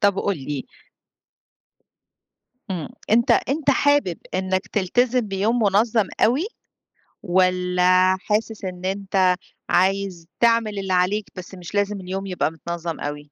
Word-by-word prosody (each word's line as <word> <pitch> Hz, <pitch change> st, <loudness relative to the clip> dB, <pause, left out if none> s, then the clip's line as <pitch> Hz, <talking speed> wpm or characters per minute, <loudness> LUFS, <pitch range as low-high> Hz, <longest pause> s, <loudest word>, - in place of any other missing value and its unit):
طب 200 Hz, -1 st, +3 dB
قُل 200 Hz, -2 st, 0 dB
لي 140 Hz, 0 st, -5 dB, 2.0 s
إمم، 175 Hz, -5 st, -3 dB, 0.2 s
أنت 235 Hz, +2 st, +4 dB
أنت 285 Hz, +1 st, +2 dB
حابب 285 Hz, -, +2 dB, 0.2 s
إنك 185 Hz, 0 st, -1 dB
تلتزم 245 Hz, +6 st, +1 dB
بيوم 205 Hz, +5 st, 0 dB
مُنظَّم 215 Hz, +1 st, +2 dB
أوي 265 Hz, -, +3 dB, 0.8 s
والَّا 185 Hz, 0 st, +3 dB
حاسس 215 Hz, 0 st, -2 dB
إن 180 Hz, -1 st, -6 dB
أنت 190 Hz, -1 st, +1 dB, 0.4 s
عايز 190 Hz, -2 st, +1 dB
تعمل 230 Hz, -3 st, +3 dB
اللي 190 Hz, -1 st, -2 dB
عليك 190 Hz, +4 st, +1 dB
بس 185 Hz, +1 st, -9 dB
مش 180 Hz, +2 st, -9 dB
لازم 205 Hz, 0 st, 0 dB
اليوم 190 Hz, +2 st, -4 dB
يبقى 180 Hz, -4 st, -1 dB
متنظَّم 170 Hz, 0 st, -5 dB
أوي؟ 145 Hz, 0 st, -6 dB
190 Hz, 120 wpm, -22 LUFS, 180-210 Hz, 2.0 s, أنت